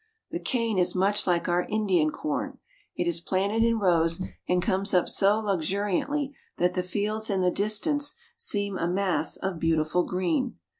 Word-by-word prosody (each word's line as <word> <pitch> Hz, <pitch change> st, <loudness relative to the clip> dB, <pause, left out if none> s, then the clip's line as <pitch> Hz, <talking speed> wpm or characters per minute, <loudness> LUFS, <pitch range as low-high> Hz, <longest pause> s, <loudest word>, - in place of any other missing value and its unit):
The -, -, -3 dB
cane 230 Hz, -5 st, -1 dB
is 180 Hz, -, +1 dB
much 200 Hz, +3 st, +1 dB
like 175 Hz, -1 st, +1 dB
our 175 Hz, 0 st, +1 dB
Indian 190 Hz, -8 st, +2 dB
corn. 150 Hz, 0 st, -3 dB, 0.4 s
It 175 Hz, -, -1 dB
is 170 Hz, -1 st, 0 dB
planted 200 Hz, +5 st, 0 dB
in 230 Hz, 0 st, +2 dB
rows, 170 Hz, -4 st, +2 dB, 0.3 s
and 180 Hz, 0 st, +3 dB
comes 190 Hz, 0 st, 0 dB
up 180 Hz, -, +3 dB
so 200 Hz, +1 st, +3 dB
luxuriantly 205 Hz, -, -1 dB, 0.2 s
that 180 Hz, +1 st, +2 dB
the 180 Hz, -, 0 dB
fields 210 Hz, +4 st, -2 dB
in 195 Hz, -2 st, +1 dB
the 180 Hz, 0 st, +3 dB
distance 285 Hz, -, +1 dB, 0.2 s
seem 200 Hz, -2 st, -1 dB
a 170 Hz, -, 0 dB
mass 185 Hz, +1 st, +1 dB
of 190 Hz, -3 st, -3 dB
beautiful 160 Hz, +1 st, +1 dB
green. 185 Hz, +9 st, -1 dB
190 Hz, 165 wpm, -27 LUFS, 175-215 Hz, 0.4 s, and